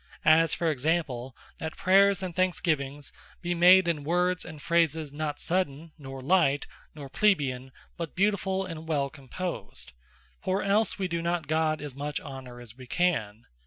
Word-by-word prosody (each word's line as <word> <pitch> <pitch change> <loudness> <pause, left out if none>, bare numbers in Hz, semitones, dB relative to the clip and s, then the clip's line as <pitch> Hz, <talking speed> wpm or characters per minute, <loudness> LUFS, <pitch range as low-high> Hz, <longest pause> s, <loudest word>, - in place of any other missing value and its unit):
As 160 +1 +5
for 165 -2 +1
example, 135 -4 -1 0.2
that 160 0 -5
Prayers, 195 +1 +4
and 180 -3 -5
Thanksgiving, 155 -6 0 0.4
be 175 0 0
made 180 +1 +6
in 155 -4 0
Words 180 +3 +1
and 160 -3 -9
Phrases, 160 -2 +1
not 150 0 -3
sudden, 165 -3 -2
nor 135 -3 -9
light, 145 -3 +3 0.3
nor 145 -2 -8
Plebeian; 135 -7 +1 0.3
but 165 -3 -5
beautifull 195 -1 +1
and 160 -2 -8
well 140 -3 0
composed; 160 +5 -6 0.5
For 190 +1 0
else 205 +3 +2
we 190 -2 -1
do 170 -1 -2
not 170 -1 -1
God 155 0 0
as 145 -3 -5
much 145 +2 -3
honour 130 -3 -9
as 120 -2 -10
we 130 -1 -12
can. 120 - 0
160 Hz, 160 wpm, -28 LUFS, 140-180 Hz, 0.5 s, made